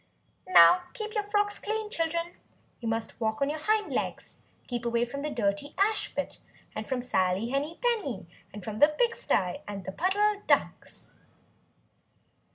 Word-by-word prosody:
"Now 360 Hz, -, +7 dB
keep 430 Hz, -2 st, -5 dB
your 420 Hz, -2 st, -1 dB
frocks 410 Hz, 0 st, +1 dB
clean, 435 Hz, 0 st, -3 dB
children! 335 Hz, -1 st, -1 dB, 0.5 s
You 235 Hz, -, -5 dB
must 225 Hz, +1 st, -2 dB
walk 220 Hz, -1 st, 0 dB
on 280 Hz, +1 st, +1 dB
your 310 Hz, -, -4 dB
hind 425 Hz, +6 st, +1 dB
legs. -, -, -3 dB, 0.3 s
Keep 240 Hz, -2 st, -4 dB
away 235 Hz, 0 st, +1 dB
from 280 Hz, +4 st, -6 dB
the 300 Hz, -, -2 dB
dirty 220 Hz, +3 st, -1 dB
ash 420 Hz, +2 st, +1 dB
pit, -, -, -3 dB, 0.3 s
and 215 Hz, 0 st, -6 dB
from 260 Hz, -2 st, 0 dB
Sally 190 Hz, -2 st, 0 dB
Henny 285 Hz, +5 st, -2 dB
Penny, 335 Hz, -, -1 dB, 0.2 s
and 205 Hz, -1 st, -9 dB
from 215 Hz, +1 st, -5 dB
the 295 Hz, -, +8 dB
pig 460 Hz, +10 st, +1 dB
stye 180 Hz, -2 st, 0 dB
and 200 Hz, -2 st, -6 dB
the -, -, -4 dB
Puddle 405 Hz, -, +1 dB
Ducks." -, -, 0 dB
290 Hz, 165 wpm, -28 LUFS, -, 0.5 s, the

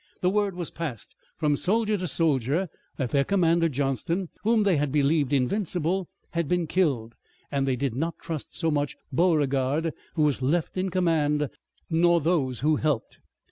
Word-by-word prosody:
The 180 Hz, -, +2 dB
word 205 Hz, -2 st, +1 dB
was 175 Hz, -2 st, -4 dB
passed 150 Hz, -10 st, -6 dB, 0.2 s
from 150 Hz, -2 st, +2 dB
soldier 215 Hz, +7 st, +2 dB
to 185 Hz, -2 st, -2 dB
soldier 155 Hz, +2 st, +1 dB, 0.3 s
that 130 Hz, -5 st, -2 dB
their 140 Hz, -1 st, +3 dB
commander, 170 Hz, -2 st, +2 dB
Johnston, 145 Hz, +6 st, -1 dB
whom 220 Hz, 0 st, +3 dB
they 195 Hz, -5 st, +3 dB
had 145 Hz, -1 st, 0 dB
believed 145 Hz, 0 st, +2 dB
invincible, 175 Hz, +5 st, 0 dB, 0.2 s
had 170 Hz, -2 st, -1 dB
been 175 Hz, +1 st, +1 dB
killed, 140 Hz, -10 st, 0 dB, 0.4 s
and 135 Hz, -1 st, 0 dB
they 130 Hz, -, +2 dB
did 130 Hz, -1 st, -1 dB
not 160 Hz, +6 st, -2 dB
trust 160 Hz, -4 st, -6 dB
so 165 Hz, -2 st, +1 dB
much 145 Hz, -1 st, -1 dB, 0.2 s
Beauregard, 150 Hz, -1 st, +2 dB, 0.2 s
who 155 Hz, -, +2 dB
was 145 Hz, -3 st, +1 dB
left 155 Hz, +6 st, 0 dB
in 185 Hz, +1 st, -1 dB
command, 150 Hz, -5 st, +1 dB, 0.4 s
nor 170 Hz, +1 st, +3 dB
those 145 Hz, -7 st, 0 dB
who 155 Hz, +1 st, +3 dB
helped. 145 Hz, -7 st, -1 dB
160 Hz, 165 wpm, -26 LUFS, 140-175 Hz, 0.4 s, their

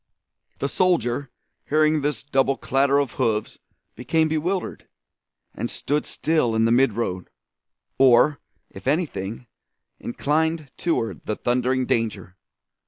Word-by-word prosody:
The 140 Hz, -, 0 dB
soldier 145 Hz, -7 st, +1 dB, 0.4 s
hearing 155 Hz, 0 st, +3 dB
this 145 Hz, -5 st, -2 dB
double 135 Hz, -1 st, +1 dB
clatter 135 Hz, +3 st, +2 dB
of 140 Hz, -4 st, 0 dB
hoofs 110 Hz, -3 st, -1 dB, 0.3 s
became 160 Hz, +7 st, +1 dB
bewildered, 175 Hz, +4 st, -2 dB, 0.7 s
and -, -, -4 dB
stood 145 Hz, +2 st, -2 dB
still 150 Hz, -8 st, +1 dB
in 110 Hz, 0 st, +3 dB
the 115 Hz, -, +2 dB
midroad, 115 Hz, -7 st, +1 dB, 0.7 s
or, 135 Hz, +2 st, +5 dB, 0.3 s
if -, -, -11 dB
anything, 125 Hz, -, -2 dB, 0.5 s
inclined 155 Hz, +3 st, -1 dB
toward 115 Hz, -, -2 dB
the 105 Hz, -, -2 dB
thundering 125 Hz, +2 st, 0 dB
danger. 110 Hz, -6 st, -2 dB
135 Hz, 110 wpm, -23 LUFS, 120-155 Hz, 0.7 s, or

